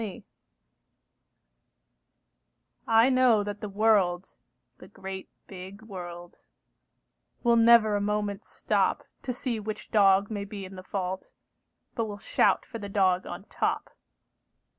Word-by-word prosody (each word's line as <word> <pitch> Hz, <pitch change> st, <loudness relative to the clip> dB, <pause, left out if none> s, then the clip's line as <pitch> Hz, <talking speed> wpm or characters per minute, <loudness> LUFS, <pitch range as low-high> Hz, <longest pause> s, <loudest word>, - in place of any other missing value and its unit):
THE -, -, -2 dB
UNDER 195 Hz, -, -7 dB
DOG -, -, -14 dB, 2.6 s
I 225 Hz, +3 st, +5 dB
know 255 Hz, -5 st, +4 dB
that 205 Hz, 0 st, -6 dB
the 210 Hz, -, -5 dB
world, 195 Hz, -3 st, +2 dB, 0.5 s
the -, -, -13 dB
great 190 Hz, 0 st, -8 dB, 0.2 s
big 190 Hz, +2 st, -10 dB
world, 175 Hz, -4 st, -9 dB, 1.0 s
Will 235 Hz, -1 st, +4 dB
never 230 Hz, -2 st, +6 dB
a 205 Hz, -, 0 dB
moment 205 Hz, -1 st, -2 dB
stop -, -, 0 dB, 0.2 s
To 255 Hz, -, -3 dB
see 245 Hz, -2 st, -3 dB
which 215 Hz, 0 st, -6 dB
dog 200 Hz, -1 st, +4 dB
may 205 Hz, -2 st, -3 dB
be 200 Hz, -1 st, -7 dB
in 190 Hz, +1 st, -10 dB
the 185 Hz, -, -8 dB
fault, 185 Hz, 0 st, -4 dB, 0.6 s
But 230 Hz, -, -1 dB
will 205 Hz, -1 st, -6 dB
shout 200 Hz, -, +2 dB
for 230 Hz, -, -8 dB
the 200 Hz, -1 st, -7 dB
dog 190 Hz, -2 st, +2 dB
on 175 Hz, +2 st, -7 dB
top. -, -, -2 dB
205 Hz, 140 wpm, -27 LUFS, 190-220 Hz, 2.6 s, never